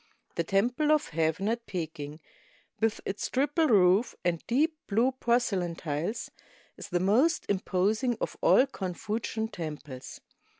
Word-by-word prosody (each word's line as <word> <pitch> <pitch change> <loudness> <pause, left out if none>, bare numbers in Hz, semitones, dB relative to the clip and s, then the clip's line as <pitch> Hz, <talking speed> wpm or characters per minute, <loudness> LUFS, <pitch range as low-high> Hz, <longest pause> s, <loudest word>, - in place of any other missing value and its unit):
The - - -1
Temple 245 +10 +1
of 305 -1 +2
Heaven 160 +4 0
at 230 +1 -2
Peking, 160 -4 -5 0.6
with 225 -1 +1
its 195 - -3
triple 295 +4 +2
roof 200 0 +4
and 170 -2 +1
deep 305 +7 +2
blue 230 +6 +2
porcelain 235 -9 0
tiles, 165 +9 -3 0.4
is - - -9
the 175 -2 +1
most 235 - +3
imposing 205 +5 +1
of - - -3
all 260 - +6
Confucian 220 0 -3
temples. 150 - -7
205 Hz, 130 wpm, -29 LUFS, 175-240 Hz, 0.6 s, all